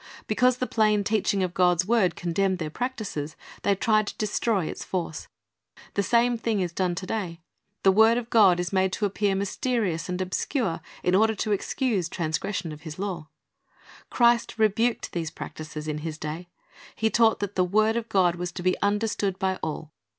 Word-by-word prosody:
Because 250 +3 +2
the 255 - -1
plain 215 -3 +2
teaching 205 -1 +1
of 180 -1 -2
God's 180 -1 +3
word 205 -5 +2
condemned 185 +2 0
their 155 -3 -4
practises, 205 - -4 0.3
they 200 - +2
tried 215 +1 +2
to - - -6
destroy 210 -3 0
its - - -5
force. 170 -4 -4 0.7
The 200 - +1
same 235 +3 +2
thing 225 -2 0
is 175 -3 -2
done 180 -1 0
to 185 - -5
day. 185 -5 -3 0.4
The 195 - +6
word 220 +4 +5
of 240 -1 -5
God 195 -6 +6
is 180 +1 -3
made 190 0 +2
to 210 - 0
appear 200 0 0
mysterious 195 -4 -1
and 180 0 -2
obscure 185 - -1 0.2
in 180 - +2
order 220 +3 +4
to 210 - -2
excuse 205 - 0
transgression 170 +2 -2
of 150 0 -9
His 155 -2 -8
law. 185 -5 -4 0.8
Christ 235 -1 +3
rebuked 225 +2 +1
these 165 -3 -3
practises 155 0 -7
in 150 0 -2
His 155 0 -5
day. 160 +3 -6 0.5
He 220 0 +1
taught 225 -2 +4
that 205 -1 -3
the 185 - +2
word 215 +4 +2
of 235 -1 -3
God 180 -3 +3
was 180 0 -3
to 180 - -6
be 185 0 +1
understood 205 -2 0
by 190 -1 0
all. 155 0 -4
195 Hz, 185 wpm, -26 LUFS, 175-220 Hz, 0.8 s, The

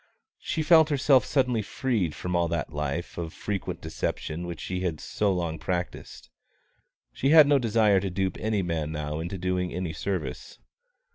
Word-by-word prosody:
She 160 - -2
felt 160 0 +6
herself 140 -2 +4
suddenly 125 -5 +1
freed 105 - -1
from 90 0 -3
all 85 -1 +2
that 85 -2 -3
life 75 +4 -3
of 80 -1 -5
frequent 100 -3 -4
deception 85 +3 -4
which 85 - -6
she 90 -1 -3
had 85 -4 -2
so 105 -2 0
long 85 -4 -2
practised. 90 0 -4 0.8
She 135 - 0
had 155 0 +9
no 145 -1 +4
desire 110 -4 +3
to 95 +1 -3
dupe 95 0 -2
any 110 -2 0
man 80 -3 -2
now 75 0 -3
into 85 +4 -4
doing 90 0 -1
any 90 -2 -3
service. 90 +1 -4
90 Hz, 165 wpm, -27 LUFS, 85-110 Hz, 0.8 s, had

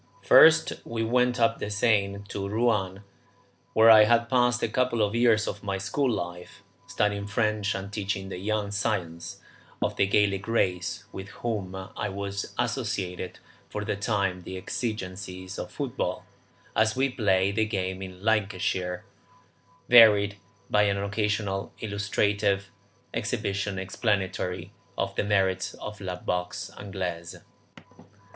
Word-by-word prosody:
First 160 0 +7
we 115 -1 -3
went 125 +2 +2
up 115 0 +2
the - - -3
Seine 100 -2 +1
to 100 -1 -4
Rouen, 105 -4 0 0.7
where 115 +1 +7
I 110 -1 +9
had 120 +1 +3
passed 120 -1 +3
a - - +3
couple 120 -1 +1
of 105 0 0
years 115 -2 +3
of 100 - -4
my 100 -1 -2
school 100 +9 0
life, 90 -5 -5 0.2
studying 100 -1 -1
French 105 -1 0
and 100 +1 -6
teaching 95 -2 -3
the 90 - -6
young 105 +1 -1
scions 100 -3 -3 0.4
of - - -1
the 100 - +3
Gallic 100 0 +1
race, 90 -6 0
with 95 +1 -7 0.2
whom 100 -5 -2
I 95 +3 -5
was 100 0 -5
associated 105 -7 -2 0.3
for 105 0 -4
the - - -1
time 100 -3 -1
the 95 +2 -7
exigencies 95 -3 -5
of - - -5
football, - - -3 0.5
as 110 0 +3
we 135 +1 +2
play 100 -5 +2
the 110 +2 +1
game 95 -3 -3
in 95 0 -9
Lancashire, 95 -4 0 0.8
varied 105 -4 +7 0.3
by 105 - +3
an 100 -1 +2
occasional 100 -1 -1
illustrative 100 -1 0 0.4
exhibition 100 0 -2
explanatory 95 -2 -2 0.2
of 95 0 -1
the - - 0
merits 95 -2 +1
of 105 -1 -8
la 90 -2 -3
boxe 90 0 -3
Anglaise. 90 -4 -5
100 Hz, 135 wpm, -27 LUFS, 95-110 Hz, 0.8 s, I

